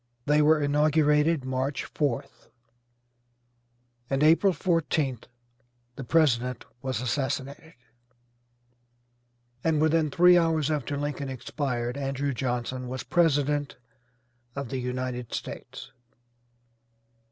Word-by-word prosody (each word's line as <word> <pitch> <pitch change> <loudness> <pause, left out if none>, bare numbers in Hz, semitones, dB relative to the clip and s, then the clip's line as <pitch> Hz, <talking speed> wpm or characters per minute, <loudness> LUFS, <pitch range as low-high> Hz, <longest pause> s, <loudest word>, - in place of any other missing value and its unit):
They 150 +1 +3
were 155 +1 +5
inaugurated 150 0 +2
March 130 +2 -2
4th, 140 -6 -3 1.6
and 135 +1 +1
April 165 +5 +5
14th 160 - -1 0.7
the 135 - -6
President 125 -5 +1 0.2
was 130 -4 -3
assassinated, 140 +4 -3 1.9
and 160 -2 +2
within 155 0 +2
three 175 +4 +6
hours 160 -3 +1
after 145 -1 -2
Lincoln 145 -1 -3
expired 125 -1 -3
Andrew 140 0 -2
Johnson 125 +1 -3
was 130 +1 -5
president 145 -4 +1 0.8
of 140 -3 -4
the 135 - -3
United 125 -1 -4
States. - - -8
140 Hz, 95 wpm, -27 LUFS, 130-155 Hz, 1.9 s, three